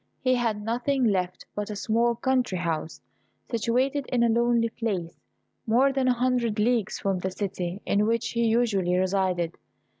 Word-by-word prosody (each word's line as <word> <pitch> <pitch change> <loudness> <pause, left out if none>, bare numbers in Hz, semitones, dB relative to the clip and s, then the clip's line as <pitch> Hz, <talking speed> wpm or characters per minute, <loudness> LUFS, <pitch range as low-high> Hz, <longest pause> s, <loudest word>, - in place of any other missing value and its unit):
He 255 -1 +2
had 230 -4 0
nothing 245 +4 0
left 185 -5 0
but 210 0 -4
a 210 - -4
small 230 +3 +1
country 250 -6 0
house, 165 -2 -3 0.5
situated 255 +4 0
in 245 -2 +1
a 235 - +3
lonely 235 0 +2
place, 195 -8 -4 0.5
more 260 +5 +4
than 265 -1 +1
a 250 - +4
hundred 245 -3 0
leagues 220 -1 +1
from 195 -2 -1
the 190 - -2
city 185 -1 -4
in 205 +1 +2
which 230 0 0
he 235 0 0
usually 205 -6 +2
resided. 185 -2 0
225 Hz, 160 wpm, -26 LUFS, 190-240 Hz, 0.5 s, more